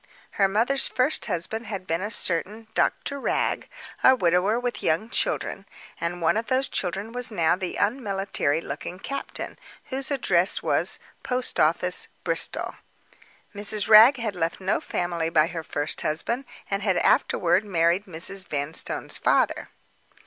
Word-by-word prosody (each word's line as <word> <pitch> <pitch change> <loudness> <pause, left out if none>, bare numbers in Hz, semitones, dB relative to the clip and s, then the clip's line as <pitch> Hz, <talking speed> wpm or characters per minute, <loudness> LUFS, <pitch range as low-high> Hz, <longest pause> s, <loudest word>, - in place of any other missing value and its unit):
Her 195 - +2
mother's 235 +8 +2
first 260 +5 0
husband 210 +4 -3
had 195 -3 -5
been 165 0 -1
a 205 - -3
certain 210 +3 -2
Doctor 280 0 0
Wragge—a 260 -1 0
widower 185 +2 +2
with 245 -1 -3
young 175 +9 0
children; - - -1 0.3
and 170 +1 -3
one 165 - +3
of 225 - -2
those 260 +1 +1
children 195 +4 -3
was 245 0 -3
now 170 -7 +2
the 185 -1 -4
unmilitary 195 - 0
looking 180 - -6
captain, 275 +8 -5 0.3
whose 265 +2 -1
address 195 -10 +1
was - - +1 0.2
"Post 250 0 -1
office, 180 +3 +2 0.2
Bristol." - - -1 0.8
Mrs. 205 0 +2
Wragge 225 +5 +9
had 220 -5 -3
left 165 -1 -2
no 190 +1 0
family 170 -2 -2
by 155 -2 +4
her 165 0 -5
first 150 -1 -2
husband; 235 - -1 0.2
and 195 0 -2
had 190 -3 +1
afterward 180 +3 +3
married 175 0 +1
Mrs. 185 +2 -4
Vanstone's 145 +1 -1
father. - - +1
195 Hz, 140 wpm, -25 LUFS, 170-230 Hz, 0.8 s, Wragge